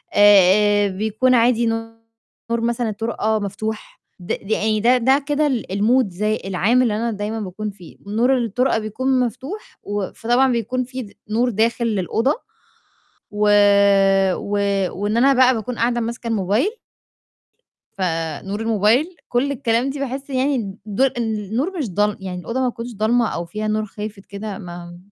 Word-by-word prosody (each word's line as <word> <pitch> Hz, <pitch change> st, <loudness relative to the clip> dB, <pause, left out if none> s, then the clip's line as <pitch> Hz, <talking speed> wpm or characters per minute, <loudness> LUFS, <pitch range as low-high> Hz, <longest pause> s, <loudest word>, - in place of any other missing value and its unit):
آآ 205 Hz, +1 st, +5 dB
بيكون 220 Hz, +6 st, +1 dB
عادي 235 Hz, 0 st, +3 dB
نور 225 Hz, 0 st, -5 dB
مثلًا 235 Hz, 0 st, -1 dB
الطُرقة 220 Hz, 0 st, -1 dB
مفتوح، 210 Hz, +2 st, -5 dB, 0.2 s
د 175 Hz, -, -12 dB
ده 210 Hz, +2 st, -2 dB
أي 215 Hz, 0 st, +1 dB
ده 245 Hz, +4 st, +4 dB
ده 265 Hz, +4 st, +3 dB
كده 295 Hz, +1 st, +2 dB
ال 255 Hz, -5 st, -1 dB
الmoods 210 Hz, -1 st, +1 dB, 0.2 s
العام 200 Hz, +7 st, +2 dB
اللي 225 Hz, -4 st, +1 dB
أنا 235 Hz, +2 st, -1 dB
دايمًا 210 Hz, +1 st, -4 dB
باكون 210 Hz, +1 st, -5 dB
فيه، 180 Hz, -4 st, -15 dB
نور 245 Hz, +5 st, +2 dB
الطُرقة 235 Hz, +1 st, 0 dB
بيكون 255 Hz, +5 st, -1 dB
مفتوح 260 Hz, -, -5 dB
و 205 Hz, -2 st, -3 dB
فطبعًا 245 Hz, +3 st, +2 dB
بيكون 240 Hz, +2 st, -1 dB
فيه 255 Hz, 0 st, -6 dB
د -, -, -18 dB, 0.2 s
نور 240 Hz, +3 st, +1 dB
داخل 230 Hz, +2 st, 0 dB
للأوضة، 225 Hz, -, 0 dB, 1.0 s
و 210 Hz, 0 st, +1 dB, 0.9 s
و -, -, -6 dB, 0.5 s
وإن 210 Hz, +2 st, 0 dB
أنا 270 Hz, +4 st, +5 dB
بقى 255 Hz, 0 st, +5 dB
باكون 230 Hz, +2 st, -4 dB
قاعدة 240 Hz, +1 st, +1 dB
ماسكة 235 Hz, +1 st, -4 dB
الموبايل. 215 Hz, -, +1 dB, 1.3 s
فنور 170 Hz, +2 st, -3 dB
الموبايل، 225 Hz, -, +2 dB
كل 260 Hz, +4 st, +1 dB
الكلام 245 Hz, -1 st, 0 dB
دي 275 Hz, +1 st, -5 dB
باحس 275 Hz, +1 st, -4 dB
يعني 255 Hz, -7 st, -1 dB
ض 205 Hz, +5 st, -2 dB, 0.2 s
النور 230 Hz, -, -2 dB
مش 265 Hz, -10 st, -2 dB
ضال 205 Hz, +2 st, +1 dB
يعني 185 Hz, -2 st, -5 dB
الأوضة، 230 Hz, +8 st, -4 dB
ما 255 Hz, -, +1 dB
تكونش 240 Hz, 0 st, -7 dB
ضالمة 225 Hz, +2 st, +2 dB
أو 170 Hz, 0 st, -4 dB
فيها 215 Hz, +5 st, -4 dB
نور 215 Hz, 0 st, 0 dB
خافت 210 Hz, -1 st, -8 dB
كده 205 Hz, 0 st, -6 dB
ما 175 Hz, -2 st, -9 dB
225 Hz, 155 wpm, -20 LUFS, 205-250 Hz, 1.3 s, آآ